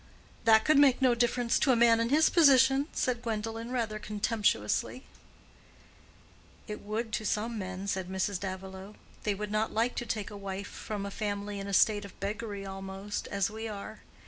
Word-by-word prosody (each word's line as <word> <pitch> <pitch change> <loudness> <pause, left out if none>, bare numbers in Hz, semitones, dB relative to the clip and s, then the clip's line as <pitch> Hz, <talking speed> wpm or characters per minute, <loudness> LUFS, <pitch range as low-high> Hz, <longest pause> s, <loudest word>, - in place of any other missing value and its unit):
"That 220 -1 +6
could 305 -2 +5
make 275 -3 +5
no 260 -2 +4
difference 240 0 +1
to 265 - +3
a - - +4
man 230 -1 +5
in 230 0 0
his 310 +4 +5
position," 270 -3 +5
said 245 -2 -1
Gwendolen, 225 0 -4
rather 225 -4 -2
contemptuously, 210 - 0 1.6
"It 210 -1 -6
would 220 +2 -3
to 215 - -1
some 220 +2 -1
men," 190 0 -5
said 190 -2 -2
Mrs. 190 0 -1
Davilow. 190 +1 -7 0.3
"They 210 -2 +1
would 210 +1 -5
not 215 +1 0
like 230 +3 +1
to 240 - -2
take 215 -2 -3
a - - -8
wife 195 0 -5
from 205 -2 -5
a 200 - -5
family 205 -1 -3
in 195 - -5
a - - -4
state 205 +2 +4
of 200 - -12
beggary 205 0 -4
almost, 195 +1 -5
as 200 0 -1
we 220 +1 -5
are. 215 0 -7
215 Hz, 180 wpm, -30 LUFS, 200-230 Hz, 1.6 s, That